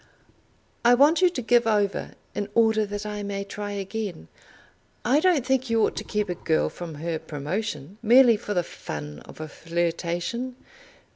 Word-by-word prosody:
"I 240 +1 +7
want 295 +7 +5
you 365 - +6
to 340 -7 -4
give 240 +1 +4
over 205 -2 0 0.2
in 205 0 -3
order 220 -2 +4
that 205 +1 -5
I 210 0 -4
may 200 -1 -3
try 205 +1 -5
again. 200 - -5 0.8
I 260 +6 +4
don't 320 -7 +3
think 265 -1 +1
you 225 -1 +4
ought - - -2
to - - -2
keep 210 0 -1
a 180 - -1
girl 160 -2 0
from 170 -3 -7
her 160 +1 -3
promotion, 160 +3 -4
merely 240 +1 +7
for 210 -1 -4
the 175 - +2
fun 75 - -7
of - - -13
a 155 - -5
flirtation. 170 - -2
205 Hz, 170 wpm, -25 LUFS, 170-235 Hz, 0.8 s, I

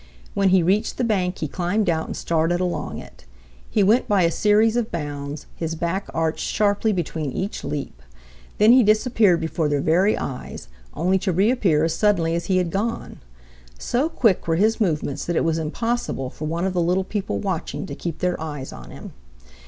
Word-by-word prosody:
When 195 -1 +2
he 185 -2 +4
reached 200 +6 +1
the - - 0
bank 190 -6 0
he 155 - -3
climbed 180 +7 -1
out 160 -2 0
and - - -5
started 165 +1 0
along 180 -1 -2
it. - - -12 0.5
He 210 - +2
went 220 +6 +3
by 200 -3 +3
a 170 - +3
series 215 +4 +3
of 240 -2 -1
bounds, 145 -2 -5
his 165 -1 -3
back 170 +4 -2
arched 160 -1 -1
sharply 210 +1 +1
between 160 -6 -2
each 195 +10 -4
leap. 140 - -5 0.6
Then 215 +2 +6
he 255 +1 +7
disappeared 215 -4 +3
before 160 -1 -1
their 145 -1 +1
very 180 +8 +2
eyes, 125 - -6 0.3
only 185 +4 +1
to 190 0 -1
reappear 190 -4 +2
as 165 0 +1
suddenly 170 -3 +2
as 170 0 -2
he 185 - +1
had 180 -2 0
gone. 220 +5 -3 0.6
So 260 - 0
quick 225 - +1
were 165 - +2
his 220 +6 +2
movements 150 -6 -1
that 175 - -2
it - - +2
was 165 0 +1
impossible 160 - -2
for 155 - -7
one 165 +3 -1
of 190 - -1
the 180 - +1
little 180 +3 +1
people 200 +1 -3
watching 190 -1 -3
to - - -7
keep 165 -2 -5
their 180 -2 0
eyes 145 -4 -6
on - - -11
him. - - -10
180 Hz, 195 wpm, -23 LUFS, 160-210 Hz, 0.6 s, he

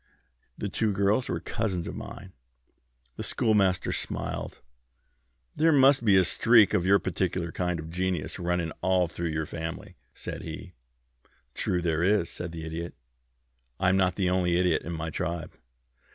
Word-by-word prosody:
The 105 - -3
two 110 +2 0
girls 100 +5 +1
were - - -1
cousins 95 -6 -2
of - - -5
mine." 95 -2 -9 0.8
The - - -4
Schoolmaster 105 -6 +2
smiled - - -4
again. - - -26 0.9
"There 160 +2 +4
must 135 -3 +5
be 100 -4 +5
a 95 - +6
streak 110 +2 +5
of 90 - +1
your 100 +1 +6
particular 90 -2 -2
kind 90 -1 -2
of 80 +1 -7
genius 90 -2 -2
running 85 -2 -1
all 95 -1 +3
through 85 0 -4
your 80 0 -2
family," 80 +1 -6
said - - -7
he. - - -8 0.8
"True 90 -1 -1
there 80 -2 +1
is," 95 -1 +2
said 85 -1 -5
the 80 -1 -7
Idiot. 85 +2 -5 0.8
"I'm 95 0 +3
not 90 -2 +2
the 90 -2 +1
only 90 -2 +2
Idiot 90 0 +2
in 85 - -6
my 80 0 -4
tribe." 85 +1 -4
90 Hz, 160 wpm, -27 LUFS, 85-100 Hz, 0.9 s, a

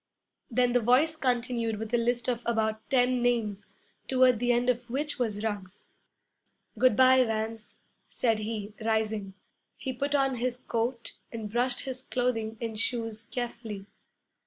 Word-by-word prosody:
Then 245 0 +2
the 245 - +5
voice 255 +8 +4
continued 245 -5 0
with 220 +2 -6
a - - +5
list 240 +1 0
of 245 -2 0
about 220 -1 0
ten 250 -1 +3
names, 225 -5 0 0.4
toward 255 -3 +4
the 245 0 +2
end 240 +1 +2
of 245 -1 0
which 290 +3 -2
was 215 -4 -1
Ruggs. 205 -3 -4 0.9
'Good 255 -4 +4
bye, 260 +1 +6
Vance,' 220 -1 -3 0.3
said 225 -3 +1
he, 210 -1 -4
rising. 220 -3 -1 0.4
He 260 - -4
put 280 +3 -1
on 270 -2 +2
his 245 +1 -1
coat 235 0 -3 0.2
and 220 -3 -5
brushed 245 +2 +1
his 260 -2 -4
clothing 225 -4 -1
and 225 -2 -4
shoes 225 -2 -2
carefully. 230 -4 -5
235 Hz, 150 wpm, -29 LUFS, 220-250 Hz, 0.9 s, bye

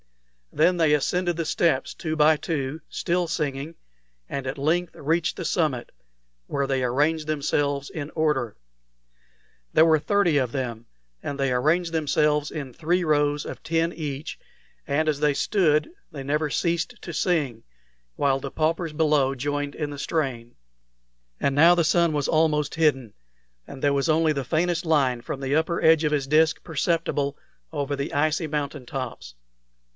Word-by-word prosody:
Then 180 +3 +3
they 160 -3 +3
ascended 175 +4 0
the 165 - -1
steps, 155 -4 +1
two 160 -2 -4
by 155 +1 +5
two, 150 -1 -3
still 175 0 -1
singing, 150 -1 -3 0.5
and 135 -1 -4
at 135 +3 -4
length 165 +5 0
reached 160 +3 0
the 180 - -4
summit, 150 -10 -1 0.6
where 140 -1 -1
they 135 -1 0
arranged 150 +5 +1
themselves 145 -2 -1
in 150 -2 -6
order. 150 -8 0 1.1
There 160 - +5
were 160 -1 +4
thirty 185 -2 +2
of 130 -4 0
them 120 -4 -4 0.4
and 140 -1 -4
they 135 -2 +1
arranged 165 +7 +1
themselves 150 -1 +1
in 140 -5 -6
three 175 +6 0
rows 145 -2 +1
of - - -8
ten 165 +1 0
each, 145 -2 -5 0.5
and 155 +3 +1
as 150 -2 +1
they 150 -2 +3
stood 160 - +2 0.2
they 140 -3 -7
never 150 +2 0
ceased 170 +2 -1
to 170 - -6
sing, 145 -9 0 0.5
while 135 -1 +1
the 135 0 -6
paupers 165 +1 0
below 150 -3 +2
joined 145 +2 -3
in 150 -2 -3
the 145 - -7
strain. 130 -7 -2 0.8
And 140 - 0
now 165 +4 +7
the 170 -2 +2
sun 170 0 +3
was 145 -2 -1
almost 155 -2 +1
hidden, 135 -9 +1 0.5
and 135 - -10
there 145 -1 +2
was 140 +3 0
only 160 0 +3
the 140 -2 -2
faintest 165 +5 0
line 135 -6 +2
from 135 - -5
the 135 +1 0
upper 160 +2 +1
edge 160 0 +5
of 150 - +1
his 140 -3 0
disk 160 +2 +3
perceptible 160 -3 -1 0.3
over 145 -2 -2
the 140 +1 -4
icy 155 +2 +1
mountain 145 -2 -3
tops. 120 - -6
150 Hz, 160 wpm, -25 LUFS, 140-160 Hz, 1.1 s, now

